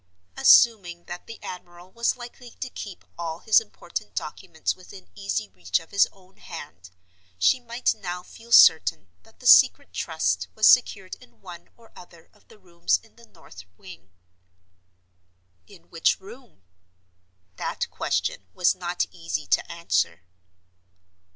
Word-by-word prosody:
Assuming 180 -7 +5
that 175 0 -9
the 230 - -10
admiral 175 0 -10
was 235 +3 0
likely 245 0 -11
to 255 +1 -8
keep 200 -4 -9
all 165 -1 -4
his 220 - +4
important - - -8
documents - - -4
within 95 - -14
easy 100 0 -3
reach 90 -1 -1
of 165 - -17
his 200 - +4
own 190 -1 -24
hand, 90 +3 -11 0.5
she 90 - +3
might 240 0 -1
now 180 -4 -6
feel 230 +5 -16
certain 155 - +6
that - - -24
the - - -15
Secret - - +6
Trust 90 0 -1
was 215 - +2
secured 195 -6 +4
in 250 - -20
one 175 -2 -12
or 230 -1 -20
other 170 -2 -16
of - - -28
the - - -18
rooms 175 -4 -1
in 225 - -24
the 235 0 -18
north 90 0 -15
wing. 95 0 -14 1.6
In 195 -4 -18
which 165 -1 +1
room? 220 - -15 0.9
That - - -3
question 95 - -2
was 180 - +3
not 175 - -2
easy 85 -2 -5
to - - 0
answer. 95 - -1
175 Hz, 145 wpm, -25 LUFS, -, 1.6 s, certain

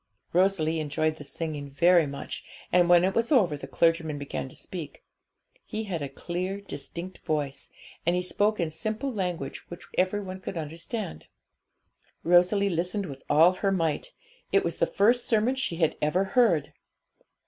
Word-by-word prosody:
Rosalie 170 -3 +2
enjoyed 155 +1 0
the 145 - -9
singing 145 0 -5
very 170 +3 +4
much, 140 0 -6 0.3
and 175 -1 +4
when 175 0 +7
it 190 +1 +2
was 230 +5 0
over 195 - +4
the 140 -2 -8
clergyman 165 +1 +1
began 140 -1 -4
to - - -15
speak. 165 -6 -8 0.6
He 220 +1 -4
had 180 -7 -3
a 140 - -3
clear, 180 +7 -4
distinct 185 -2 -7
voice, 145 -3 -3 0.3
and 175 +1 +2
he 180 - 0
spoke 205 +3 +1
in 165 -2 0
simple 220 - -3
language 180 -8 -4
which 175 - -9
every 185 +3 +2
one 190 -1 -6
could 185 -1 -6
understand. 165 - -5 1.0
Rosalie 180 +4 +4
listened 180 +3 -1
with 135 -5 -8
all 160 +4 +7
her 195 +1 0
might; 170 - 0 0.4
it - - +4
was - - -2
the - - +3
first 235 +5 +3
sermon 225 +3 +3
she 260 -10 -2
had 165 -2 +1
ever 160 +6 +2
heard. 195 - +2
175 Hz, 165 wpm, -27 LUFS, 155-195 Hz, 1.0 s, when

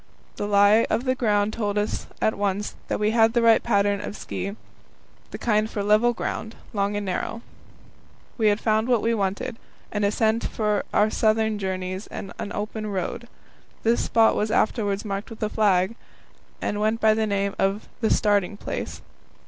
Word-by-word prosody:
The 205 - -2
lie 205 +2 +5
of 225 +2 +1
the 255 -1 +1
ground 210 -4 +1
told 210 -3 -2
us 210 +1 -2
at 220 - +2
once 205 0 -1
that - - -2
we 210 +1 +2
had 225 0 +4
the 240 - +3
right 230 -1 +6
pattern 200 -2 +1
of 205 - -6
ski 200 +1 -5 0.7
the - - -6
kind 215 -2 +1
for 205 - -3
level 215 +4 +4
ground, 225 -1 -4 0.2
long 200 0 0
and 205 0 -2
narrow. 210 +5 -3 0.9
We 220 -3 +2
had 205 0 +3
found 220 0 +1
what 240 -4 +2
we 230 - +2
wanted 200 +1 -2 0.3
an 210 -1 -1
ascent 220 +2 +1
for 210 -2 -1
our 215 +1 +3
southern 220 -1 +1
journeys 185 0 -3
and 195 - -7
an 205 - -4
open 215 +1 -4
road. 200 +4 -3 0.6
This 230 +1 +2
spot 225 -1 +4
was 215 - 0
afterwards 205 -2 0
marked 200 0 -4
with 225 -1 -7
a 215 - 0
flag, 200 -2 +2 0.7
and 205 - -1
went 220 +2 +1
by 220 -1 +5
the 220 0 0
name 200 -1 0
of 195 +2 0
"the 225 - +1
starting 205 -2 +2
place." - - -5
210 Hz, 180 wpm, -24 LUFS, 200-220 Hz, 0.9 s, right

